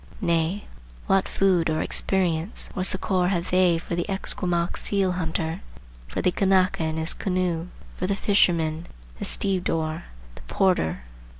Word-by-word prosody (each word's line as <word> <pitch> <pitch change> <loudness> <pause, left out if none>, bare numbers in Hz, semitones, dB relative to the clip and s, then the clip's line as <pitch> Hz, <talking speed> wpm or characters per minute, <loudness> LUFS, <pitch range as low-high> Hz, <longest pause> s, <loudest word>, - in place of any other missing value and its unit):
Nay, 170 +1 0 0.4
what 195 0 +2
food 180 -4 +2
or 155 0 0
experience 180 -1 -1
or 185 - -1
succor 185 -1 +1
have 180 -2 -1
they 180 -2 +4
for 170 +1 -4
the 175 +4 -3
Esquimaux 175 -3 -1
seal 195 -2 0
hunter, 165 -2 -3 0.5
for - - -4
the 180 - +3
Kanaka 190 -2 +2
in 160 0 -2
his 160 +1 +1
canoe, 180 -3 -1 0.3
for 185 - -2
the 200 - 0
fisherman, 170 -6 +1 0.3
the - - -3
stevedore, 165 -4 +1 0.3
the - - -13
porter? 80 - +1
180 Hz, 140 wpm, -24 LUFS, 165-190 Hz, 0.5 s, they